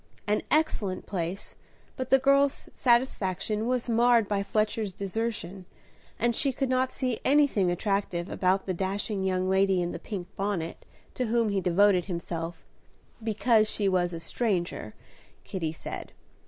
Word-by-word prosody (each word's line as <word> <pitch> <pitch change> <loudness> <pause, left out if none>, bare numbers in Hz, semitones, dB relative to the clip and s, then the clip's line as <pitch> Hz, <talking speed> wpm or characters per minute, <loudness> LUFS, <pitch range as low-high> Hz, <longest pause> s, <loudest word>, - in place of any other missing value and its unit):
An 210 +1 +1
excellent 230 -12 0
place, 180 0 -4 0.4
but 255 0 -4
the 270 - +7
girl's 275 +1 +2
satisfaction 220 -3 +1
was 250 -1 0
marred 235 -1 +4
by 200 -1 0
Fletcher's 215 0 -1
desertion, 195 -2 -4 0.5
and 235 +1 +1
she 275 - +2
could 265 +1 -2
not 255 0 +1
see 255 -4 -2
anything 275 -10 +3
attractive 180 -1 -1
about 190 0 +1
the 185 - -1
dashing 195 +2 -2
young 185 -1 0
lady 190 0 +3
in 175 0 -1
the - - -6
pink 190 -5 -6
bonnet 195 -5 -3 0.3
to 250 - -2
whom 230 -1 +2
he 200 -1 0
devoted 185 0 +4
himself, 170 -2 -5 0.6
"because 220 0 +3
she 205 -2 0
was 180 -2 +2
a 165 - -5
stranger," 175 - -2 0.5
Kitty 165 -5 -3
said. 160 - -7
200 Hz, 145 wpm, -28 LUFS, 185-235 Hz, 0.6 s, the